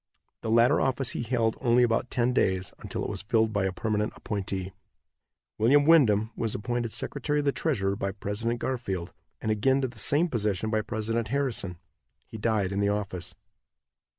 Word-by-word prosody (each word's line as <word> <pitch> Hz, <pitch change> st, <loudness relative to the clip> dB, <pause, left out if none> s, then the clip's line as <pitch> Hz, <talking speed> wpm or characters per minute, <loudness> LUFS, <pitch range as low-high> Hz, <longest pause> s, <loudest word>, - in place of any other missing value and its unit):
The 110 Hz, -, -4 dB
latter 115 Hz, +2 st, +4 dB
office 135 Hz, -1 st, 0 dB
he -, -, -3 dB
held 115 Hz, -2 st, 0 dB
only 125 Hz, -1 st, +4 dB
about 120 Hz, +1 st, +1 dB
ten 125 Hz, +1 st, +1 dB
days, 95 Hz, -6 st, +1 dB
until -, -, -4 dB
it -, -, -3 dB
was -, -, -5 dB
filled 110 Hz, +1 st, +1 dB
by 100 Hz, -2 st, +1 dB
a 95 Hz, -, 0 dB
permanent 105 Hz, +2 st, -1 dB
appointee. 95 Hz, -2 st, -4 dB, 0.9 s
William 140 Hz, +6 st, +5 dB
Windom 115 Hz, -10 st, +5 dB
was 115 Hz, -2 st, -2 dB
appointed 120 Hz, +1 st, -2 dB
secretary 145 Hz, +6 st, -2 dB
of 145 Hz, -, 0 dB
the 140 Hz, -, +3 dB
treasury 100 Hz, -12 st, 0 dB
by 100 Hz, -1 st, -2 dB
President 110 Hz, +4 st, -3 dB
Garfield, 100 Hz, -10 st, -3 dB, 0.3 s
and 110 Hz, -, 0 dB
again 130 Hz, +6 st, +2 dB
to 130 Hz, -, 0 dB
the 120 Hz, -2 st, -7 dB
same 150 Hz, -, +3 dB
position 110 Hz, -, -1 dB
by 110 Hz, -1 st, +2 dB
President 110 Hz, +1 st, -2 dB
Harrison. 120 Hz, -9 st, -1 dB, 0.5 s
He 110 Hz, -, -9 dB
died 105 Hz, -3 st, +1 dB
in 100 Hz, -, -1 dB
the 100 Hz, 0 st, +2 dB
office. 100 Hz, -4 st, -3 dB
110 Hz, 180 wpm, -27 LUFS, 100-125 Hz, 0.9 s, William